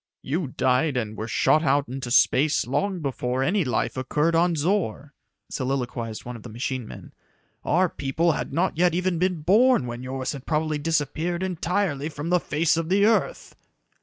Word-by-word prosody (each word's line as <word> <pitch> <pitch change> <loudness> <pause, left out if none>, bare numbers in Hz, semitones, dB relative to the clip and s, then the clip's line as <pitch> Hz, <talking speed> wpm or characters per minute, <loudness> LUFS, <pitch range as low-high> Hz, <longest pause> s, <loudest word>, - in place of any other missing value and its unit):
"You 155 +3 -2
died 130 +2 +1
and 110 -3 -3
were 110 +1 -5
shot 155 +6 +3
out 145 -1 +2
into 130 0 -5
space 135 +3 +3
long 180 - -1
before 130 -2 -2
any 185 +6 +1
life 125 -6 -1
occurred 150 +5 0
on 170 +1 +3
Zor," 150 - -1 0.4
soliloquized 125 -4 -3
one 125 0 -6
of 115 - -10
the 120 - -10
machine 120 +1 -4
men. - - -11 0.5
"Our 180 +4 +2
people 160 +3 0
had - - -3
not 170 +2 0
yet 175 -1 +3
even 180 -1 0
been 180 -3 0
born 215 - +4
when 120 0 -6
yours 130 0 -3
had 140 -3 -9
probably 155 -1 0
disappeared 165 +3 -1
entirely 175 -4 -1
from 150 +1 -6
the 180 - +4
face 160 0 +1
of 165 0 -2
the 200 +2 +4
earth." 225 - 0
150 Hz, 175 wpm, -24 LUFS, 130-175 Hz, 0.5 s, born